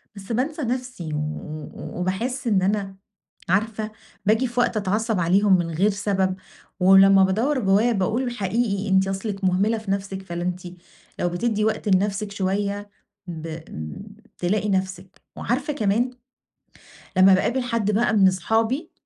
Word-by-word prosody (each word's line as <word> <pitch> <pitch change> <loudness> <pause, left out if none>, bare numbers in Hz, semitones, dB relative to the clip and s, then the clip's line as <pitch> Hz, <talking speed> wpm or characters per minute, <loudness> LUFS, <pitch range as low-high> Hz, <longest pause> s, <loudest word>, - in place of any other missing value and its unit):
بس 200 +3 -9
بانسى 285 +7 -1
نفسي 250 - -3
و 150 0 -5 0.3
وباحس 235 +9 -2
إن 200 -4 +3
أنا 195 0 -1 0.5
عارفة 215 +2 0 0.3
باجي 220 +5 +3
في 245 +1 -3
وقت 240 - +2
أتعصّب 215 +1 0
عليهم 190 +3 +4
من 175 -2 -2
غَير 190 +7 +2
سبب، 195 -2 0 0.4
ولمّا 195 +1 +7
بادوّر 230 +9 +1
جوّايا 205 +3 +3
باقول: 235 +5 0
"حقيقي 210 -1 -1
أنتِ 190 0 +3
أصلِك 195 +1 -4
مُهملة 195 +5 +2
في 215 -3 -5
نَفسِك 195 -1 -3
فلا 175 -2 -6
أنتِ 180 0 -3 0.6
لو 175 - +1
بتدّي 210 +4 0
وقت 220 - -1
لنَفسِك 200 +1 -1
شويّة 200 +1 -2 0.4
ب 165 -1 -6 0.9
تلاقي 210 +4 0
نَفسِك." 190 -1 -3
وعارفة 275 +5 -2
كمان، 235 0 +1 1.1
لمّا 190 +1 +7
باقابل 245 +7 +1
حد 230 -4 -1
بقى 220 +3 +2
من 195 -2 +6
أصحابي 225 - 0
200 Hz, 140 wpm, -23 LUFS, 190-225 Hz, 1.1 s, ولمّا